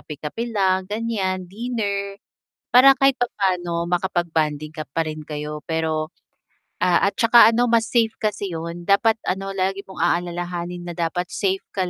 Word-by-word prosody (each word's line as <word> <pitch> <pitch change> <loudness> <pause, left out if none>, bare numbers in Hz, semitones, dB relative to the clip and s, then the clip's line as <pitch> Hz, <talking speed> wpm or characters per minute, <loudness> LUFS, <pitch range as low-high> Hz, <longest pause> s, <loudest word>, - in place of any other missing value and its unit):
kape-kape 155 +10 -6
lang, 190 -2 +1
ganyan, 205 -4 -2
dinner. 200 -3 -3 0.6
Para 265 +2 +9
kahit 270 -1 +4
papano 180 -8 -1
makapag-bonding 160 -4 -1
ka 155 - -4
pa 165 +2 -1
rin 155 0 -6
kayo 150 0 -6
pero 160 -1 -2 0.7
ah, 180 +2 +3
at - - -17
saka 230 -1 +7
ano 235 +2 +2
mas 230 -1 +2
safe 225 -2 +2
kasi 205 -4 -2
yun 170 +1 -6
dapat 220 +4 +3
ano 195 +1 -2
lagi 195 +1 0
mong 190 - -11
aalalahanin 175 0 -2
na 175 - -5
dapat 170 +1 -2
safe 195 -1 -1
ka 185 -2 -1
185 Hz, 150 wpm, -22 LUFS, 170-210 Hz, 0.7 s, Para